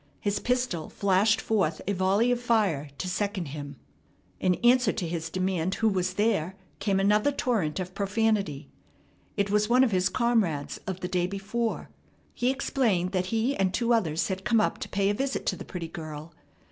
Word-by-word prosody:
His 205 0 -1
pistol 245 -10 -1
flashed 200 +2 +2
forth 185 -8 0
a 200 - +1
volley 195 +6 +2
of 245 0 0
fire 205 - +1
to 185 - -4
second 190 -3 -2
him. 145 -1 -7 0.6
In 180 -1 +2
answer 245 -2 +5
to 175 - -3
his 165 -1 -3
demand 185 0 -1
who 225 - +1
was 185 -3 0
there 190 -4 +1 0.2
came 195 -2 +1
another 210 +7 +3
torrent 210 - -1
of 185 0 -5
profanity. 200 - 0 0.7
It 200 0 0
was 210 +1 +2
one 250 +2 +5
of 250 - +2
his 185 0 +2
comrades 210 - 0
of 190 -1 -4
the 180 - -2
day 180 -1 0
before. 205 +4 -3 0.4
He 245 - 0
explained 235 -9 0
that 185 -1 -1
he 230 +6 0
and 190 -5 +1
two 240 0 +2
others 170 -8 +1
had 190 0 -3
come 230 +1 +3
up 215 - 0
to - - -6
pay 195 +1 +1
a - - 0
visit 270 +5 -2
to - - 0
the - - -9
pretty 175 -3 -5
girl. 155 -2 -8
195 Hz, 185 wpm, -27 LUFS, 180-225 Hz, 0.7 s, answer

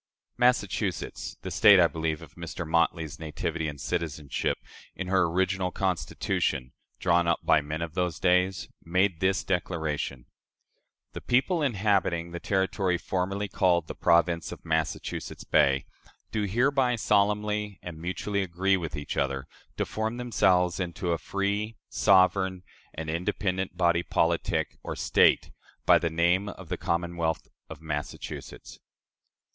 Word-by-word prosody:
Massachusetts 105 -6 0
the - - -5
State, 100 -2 +7
I 90 - +7
believe, 80 -1 -2
of - - -14
Mr. 85 0 -6
Motley's 85 -1 0
nativity 80 +1 -3
and 70 -2 -6
citizenship 75 -2 -2 0.4
in 95 -1 -5
her 95 -2 +4
original 95 +2 0
Constitution, 75 -7 -1 0.3
drawn 85 -1 +3
up 85 - +2
by 80 - +4
"men 75 +3 -4
of 80 -2 -6
those 90 -2 -1
days," 90 +1 +2 0.2
made 90 0 +1
this 95 +2 +1
declaration: 80 -8 -2 0.9
"The - - -6
people 145 +8 +2
inhabiting 100 - +1
the 85 - -5
territory 95 -2 0
formerly 95 +3 -2
called 90 -3 +2
the - - -6
Province 85 -1 +2
of - - -10
Massachusetts 80 -1 -2
Bay 70 0 +3 0.5
do 105 -1 0
hereby 125 +4 +2
solemnly 105 -1 +1
and 85 -3 -8
mutually 95 +4 -2
agree 95 +1 +1
with 80 -4 -5
each 70 0 -5
other 70 -1 -1 0.3
to - - 0
form 110 +2 -3
themselves 95 -8 +2
into 90 0 -2
a 85 - 0
free, 100 +3 -2
sovereign, 95 -1 +3 0.3
and 80 0 -5
independent 95 +3 -2
body 85 -1 +3
politic, 80 -1 0
or - - -5
State, - - +3 0.3
by - - +6
the 85 - 0
name 85 +5 +2
of 95 -5 -10
The - - -2
Commonwealth 85 -1 -1 0.2
of - - -9
Massachusetts." 75 -2 -6
90 Hz, 135 wpm, -27 LUFS, 80-95 Hz, 0.9 s, State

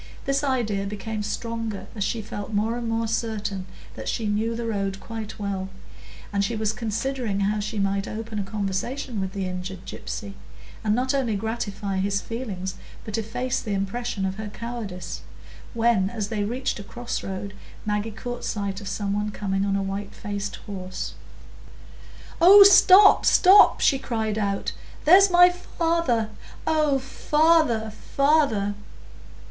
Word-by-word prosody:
This 275 +1 +1
idea 220 -8 0
became 210 +1 -4
stronger 225 0 -4
as 205 - -1
she 220 +3 -2
felt 205 0 -6
more 215 +2 0
and 240 -1 -3
more 225 0 0
certain 215 -4 -2 0.3
that - - -5
she 225 - -2
knew 215 +2 0
the 235 0 -4
road 195 -3 -2
quite 220 0 -7
well, 195 -2 -3 0.6
and 200 0 +2
she 230 +4 -1
was 215 -1 0
considering 230 -1 -2
how 210 +2 +1
she 215 +2 -4
might 195 0 0
open 220 0 -5
a - - -1
conversation 210 +4 -3
with 190 0 -4
the 195 -1 -2
injured 185 0 -6
gypsy, 200 +1 -6 0.5
and 210 -1 +2
not 255 +2 0
only 255 -6 0
gratify 205 -2 -3
his 195 +1 0
feelings 200 -6 -5 0.3
but 215 - -4
efface 245 +3 -2
the 210 -3 -2
impression 195 +1 -2
of 190 0 -3
her 220 -1 -5
cowardice, 205 -6 -6 0.5
when, 225 -5 +2
as 215 -3 -4
they 210 -2 -1
reached 245 +3 -2
a - - -6
cross 240 +4 -5
road. 195 +1 -5 0.3
Maggie 210 +1 -1
caught 245 +3 -6
sight 200 -1 -3
of 200 - -8
some 200 0 -2
one 210 +1 -1
coming 195 -1 -2
on 195 - +1
a 195 - 0
white 195 +1 -5
faced 205 -2 -4
horse. 185 -3 -5 1.3
"Oh, 400 +4 +10
stop, 395 +1 +8
stop!" 395 +2 +7
she 270 - +4
cried 220 -4 -2
out. 200 -1 -1 0.3
"There's 385 +5 +8
my 355 0 +7
father! 330 -10 -1 0.3
Oh, 305 -3 +2
father, 295 -4 +2
father!" 275 -5 +1
215 Hz, 155 wpm, -25 LUFS, 200-240 Hz, 1.3 s, Oh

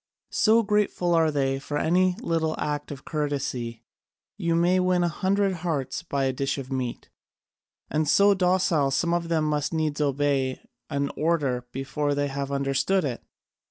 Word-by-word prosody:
So 225 +1 +4
grateful 205 -4 +1
are 165 -1 +4
they 135 -2 0
for 145 +2 -4
any 180 +4 +2
little 160 -6 0
act 145 -1 -3
of 140 -2 -8
courtesy, 140 -6 -3 0.5
you 170 0 0
may 175 +2 +3
win 180 -1 +2
a - - +2
hundred 195 +3 +1
hearts 150 -7 -2
by 140 -5 -2
a 135 -1 +1
dish 135 +2 -1
of 135 -1 -7
meat! 130 -2 -4 0.8
And 155 -1 0
so 200 +4 +6
docile, 180 -6 +2
some 170 +5 +1
of 170 -1 0
them 160 -2 +1
must 150 +1 -1
needs 155 -2 -1
obey 140 -2 0 0.3
an 140 0 -1
order 140 -7 0
before 145 +2 -2
they 145 0 0
have 140 0 -4
understood 140 +7 +1
it! 125 -4 -3
150 Hz, 160 wpm, -26 LUFS, 140-175 Hz, 0.8 s, so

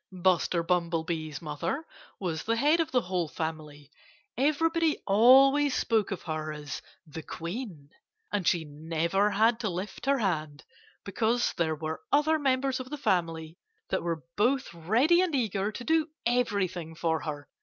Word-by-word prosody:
Buster 180 -2 +1
Bumblebee's 165 -3 -1
mother 265 - -3 0.3
was 165 -5 -2
the 230 - 0
head 295 +8 +3
of 325 - +1
the 250 - +2
whole 180 -2 -1
family. 150 -2 -6 0.4
Everybody 320 +4 +2
always 265 +6 +6
spoke 220 -3 +1
of 195 - -5
her 155 -1 -3
as 150 -2 -6 0.2
"the 160 0 -8
Queen." 170 - -7 0.4
And 200 -4 -1
she 170 -2 +2
never 165 +6 0
had 225 +3 +3
to 215 - -1
lift 190 +7 -6
her 280 0 +4
hand, 155 - -2 0.4
because 225 +4 0
there 160 -2 0
were 160 +1 -5
other 310 +2 +3
members 265 -1 +1
of 255 0 -7
the 295 - -5
family 165 - -1 0.3
that - - 0
were 165 -2 -3
both 250 +4 +1
ready 235 - +3
and 355 -5 0
eager 210 -5 0
to 240 - -7
do 320 +2 +2 0.2
everything 200 -9 0
for 160 -1 0
her. 145 -3 -6
190 Hz, 155 wpm, -28 LUFS, 160-255 Hz, 0.4 s, always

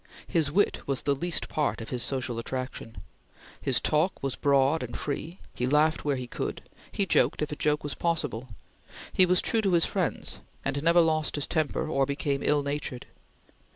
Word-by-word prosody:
His 160 -5 +1
wit 205 +6 +2
was 135 -2 +2
the 140 - +2
least 170 +5 -2
part 150 -2 -1
of 115 - -7
his 125 -2 -2
social 125 -3 -1
attraction. 125 -2 -5 0.6
His - - +3
talk 155 +3 +1
was 135 -2 -1
broad 140 +2 +3
and 120 -1 -5
free. 160 +4 -4 0.2
He 125 - -1
laughed 150 +3 +3
where 145 -2 +1
he 130 -1 -4
could; 120 - -5 0.2
he 200 - 0
joked 180 - +2
if 150 - -3
a - - -2
joke 150 0 0
was 145 - -3
possible; 145 -8 -2 0.6
he 185 - +6
was 180 0 +3
true 225 - +2
to 195 -4 +1
his 170 -1 +5
friends, - - -2 0.3
and 140 - -1
never 170 +2 +5
lost 155 -2 +1
his 145 - -1
temper 155 -1 -1
or 135 -3 +1
became 140 0 -1
ill 145 -1 +2
natured. 140 -3 -4
145 Hz, 190 wpm, -28 LUFS, 135-160 Hz, 0.6 s, he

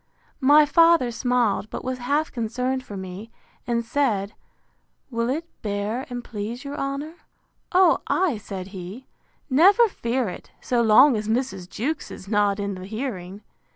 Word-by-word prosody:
My 295 +2 +6
father 330 -4 +4
smiled, 240 -3 0
but - - -6
was 255 0 -3
half 285 +6 0
concerned 250 +3 -2
for 205 -5 -8
me; 190 +4 -8 0.4
and 235 -1 0
said, 225 -6 0 0.8
Will 230 0 -1
it 310 +6 -2 0.2
bear, 210 +6 -3
and 245 -1 -5
please 230 +4 -6
your 280 0 -6
honour?—O 315 +5 -1
ay, 345 - +1
said 195 -2 -7
he, 195 +6 -8 0.4
never 385 - +6
fear 245 - -2
it; 180 - -8
so 245 -1 0
long 235 +5 +6
as 210 -1 -3
Mrs. 220 -6 -2
Jewkes 285 +12 -3
is 185 - -10
not 205 -1 +1
in 200 0 -2
the 185 0 -8
hearing. 205 -4 -5
240 Hz, 150 wpm, -24 LUFS, 205-275 Hz, 0.8 s, My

